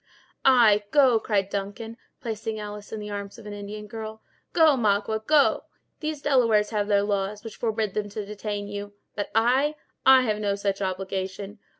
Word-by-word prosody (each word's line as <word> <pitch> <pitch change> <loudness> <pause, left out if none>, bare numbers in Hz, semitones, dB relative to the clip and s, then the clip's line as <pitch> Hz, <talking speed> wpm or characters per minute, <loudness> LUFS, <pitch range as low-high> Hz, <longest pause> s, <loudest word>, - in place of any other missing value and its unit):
"Ay, 230 -6 +6
go," 260 -3 +5
cried 200 -3 0
Duncan, 205 +3 -4 0.3
placing 220 -1 -4
Alice 210 0 -8
in 220 - -4
the 210 0 -6
arms 200 +1 -6
of 230 - -13
an 210 - -6
Indian 205 +1 -7
girl; 220 0 -8 0.3
"go, 320 -4 +5
Magua, 220 -1 +1
go. 300 -2 +4 0.3
These 305 -2 -4
Delawares 230 -7 +3
have 205 -2 0
their 200 -1 +3
laws, 205 0 -2
which 225 - -9
forbid 220 -3 -1
them 210 -1 -2
to 205 0 -5
detain 205 0 -5
you; 205 0 -6 0.2
but 205 - -3
I—I 265 +2 +3
have 215 -3 0
no 200 -1 0
such 200 0 -2
obligation. 190 +2 -4
210 Hz, 170 wpm, -25 LUFS, 205-230 Hz, 0.3 s, Ay